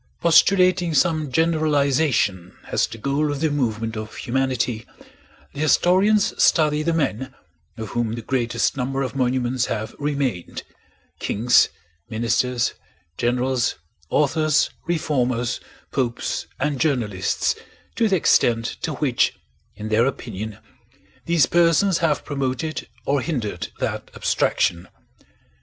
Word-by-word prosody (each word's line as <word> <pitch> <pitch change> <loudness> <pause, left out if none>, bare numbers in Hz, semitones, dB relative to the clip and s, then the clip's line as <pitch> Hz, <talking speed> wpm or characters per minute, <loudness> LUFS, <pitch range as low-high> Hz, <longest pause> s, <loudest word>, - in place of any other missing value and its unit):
Postulating 180 0 +4
some 155 -1 +2
generalization 145 - +1
as - - +2
the 115 - -9
goal 140 +5 0
of 145 - -3
the 155 0 +1
movement 115 -5 -1
of 110 0 -6
humanity, 125 -2 -1 0.7
the 145 - -8
historians 190 +7 +3
study 150 -2 +4
the 165 +2 0
men 130 -5 -2 0.4
of 110 -2 -6
whom 120 -2 -1
the 115 -1 -5
greatest 120 -1 0
number 135 +1 -2
of 130 - -5
monuments 125 -1 0
have 110 0 -3
remained: 140 -11 -2 0.6
kings, 120 +4 +3 0.4
ministers, 120 +2 0 0.4
generals, 125 +2 0 0.3
authors, 155 +1 +2 0.2
reformers, 130 -8 0 0.3
popes, 120 -3 -2
and 140 -1 -1
journalists, 115 - 0 0.4
to 230 - +2
the 195 - +3
extent 115 -8 +3 0.2
to 160 - -2
which 130 -4 +1 0.4
in 105 +1 -6
their 115 +3 +3
opinion 110 -5 -5 0.7
these 165 -5 +4
persons 170 +2 +3
have 160 -3 0
promoted 140 +2 -3 0.2
or 140 -1 +1
hindered 125 -11 -3
that - - -3
abstraction. 85 +1 0
135 Hz, 115 wpm, -22 LUFS, 120-155 Hz, 0.7 s, Postulating